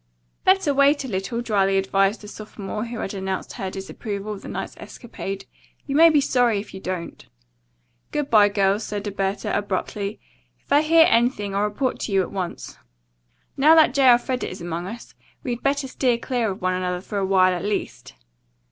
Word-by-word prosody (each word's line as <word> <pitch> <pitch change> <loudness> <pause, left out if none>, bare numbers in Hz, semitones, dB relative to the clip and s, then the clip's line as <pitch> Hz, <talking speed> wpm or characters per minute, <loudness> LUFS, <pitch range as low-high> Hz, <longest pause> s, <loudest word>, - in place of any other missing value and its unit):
"Better 375 -6 +3
wait 280 +1 +3
a - - -5
little," 220 +3 -3
dryly 195 -4 +1
advised 195 +2 +1
the 210 - -10
sophomore 210 0 -6
who 235 0 -6
had 205 - -4
announced 190 -1 -4
her 195 -5 -4
disapproval 200 +2 -5
of 200 - -9
the - - -10
night's - - -5
escapade. 195 -4 -7 0.4
"You 275 - -3
may 330 +2 +8
be 305 -2 +4
sorry 245 -6 +2
if 200 - -9
you 190 - -7
don't." 185 -2 -5 0.9
"Good 295 -2 -1
bye, 210 -2 +6
girls," 200 +1 +1
said 205 -1 -4
Alberta 195 0 -2
abruptly. 205 +1 -3 0.4
"If - - -4
I 290 - +6
hear 320 +1 +6
anything, 230 -4 +1
I'll 200 +1 +1
report 250 +5 -2
to - - -4
you 195 -1 +3
at - - -8
once. 185 -3 -5 0.8
Now 305 +4 +6
that 315 -5 +5
J. 270 -2 +5
Elfreda 245 +1 +2
is 185 - -8
among 170 +1 -4
us, 230 +4 -9 0.3
we'd 240 -2 -3
better 275 0 0
steer 255 -2 +1
clear 240 -2 -1
of 190 -1 -6
one 185 0 +1
another 180 -1 -2
for 200 +1 -4
a - - -1
while 185 -1 +4
at 180 - -4
least." 205 - -4
210 Hz, 190 wpm, -23 LUFS, 195-250 Hz, 0.9 s, may